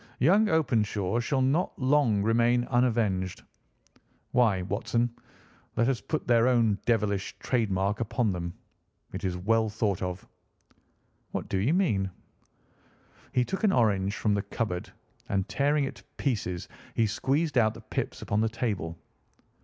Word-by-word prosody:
Young 200 +10 +4
Openshaw 115 - +1
shall 130 +2 +1
not 145 +7 +1
long 130 -7 +3
remain 120 +2 +3
unavenged. 110 -7 +1 0.9
Why, 110 -7 +3
Watson, 115 +5 0 0.6
let 115 - +2
us 130 -5 0
put 155 - -3
their 120 0 +4
own 115 -5 +3
devilish 105 -4 0
trade 115 -5 0
mark 95 +2 0
upon 115 -1 0
them. 85 -1 -3 0.6
It 95 +3 -5
is 90 -2 -1
well 110 +4 +2
thought 105 -3 -1
of!" 90 0 -4 1.1
"What - - -3
do 95 - 0
you 130 - +2
mean?" 105 - +1 1.2
He 125 -1 +2
took 190 - -4
an 210 - +5
orange 100 - +2
from 105 - +1
the 100 - +1
cupboard, 100 -3 -3 0.4
and 95 -1 0
tearing 145 +1 +1
it 135 - -4
to - - -16
pieces 100 -10 -2 0.3
he 115 - +3
squeezed 135 +8 0
out 110 -1 +2
the 115 - -10
pips - - -4
upon 105 +1 0
the 110 - +2
table. 105 -8 -3
115 Hz, 145 wpm, -28 LUFS, 100-125 Hz, 1.2 s, an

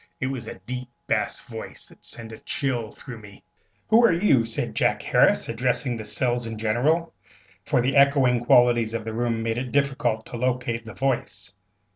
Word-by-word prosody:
It - - -1
was 125 -4 -6
a - - -6
deep 125 +6 -6 0.2
bass - - -1
voice - - -9
that - - -18
sent 115 0 -8
a 110 - -10
chill 125 -6 -2
through 125 -1 -10
me. 105 -2 -14 0.5
"Who 225 +2 +6
are 235 - +6
you?" 165 - +3
said 115 - -3
Jack - - +1
Harris, - - +3
addressing 125 +2 0
the 110 -2 -6
cells 120 +2 -1
in 115 -1 -5
general; 125 +10 +1 0.5
for - - +2
the 130 +3 0
echoing 135 -4 +4
qualities 120 -2 +4
of 110 -1 -4
the 110 - -4
room 115 -1 -1
made 115 +1 -1
it 125 -1 -5
difficult 130 -6 0
to 120 - -7
locate 120 -2 -1
the 110 - -9
voice. 130 -6 -2
120 Hz, 185 wpm, -25 LUFS, 115-130 Hz, 0.5 s, Who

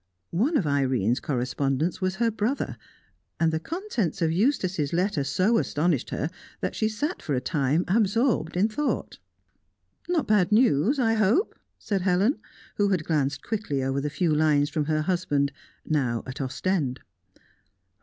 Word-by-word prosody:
One 255 - +2
of 195 - 0
Irene's 130 -6 +1
correspondents 135 +5 -1
was 185 0 0
her 230 +2 +1
brother, 220 +6 -2 0.6
and 165 -1 +2
the 160 - 0
contents 320 - -3
of 165 -2 +1
Eustace's 185 - 0
letter 180 -3 +1
so 200 +11 +2
astonished 150 -3 0
her 150 +4 -2 0.3
that - - -2
she 220 - 0
sat 290 - -3
for 145 - -2
a - - +1
time 145 +3 0
absorbed 215 -2 +1
in 200 +4 +4
thought. 275 +7 -2 0.9
"No 345 -4 +2
bad 210 -4 +2
news, 220 - +4
I 230 -4 +2
hope?" 220 - +2 0.2
said 200 -3 -2
Helen, 195 - +2 0.4
who 205 -1 +3
had 185 -5 +1
glanced 145 -3 0
quickly 200 -12 -2
over 135 +1 -1
the 150 - -2
few 160 +1 0
lines 150 -1 +3
from 150 -2 -1
her 155 0 0
husband, 155 -6 0 0.3
now 125 -7 0
at 130 +2 -6
Ostend. 135 +1 -1
175 Hz, 155 wpm, -26 LUFS, 145-215 Hz, 0.9 s, in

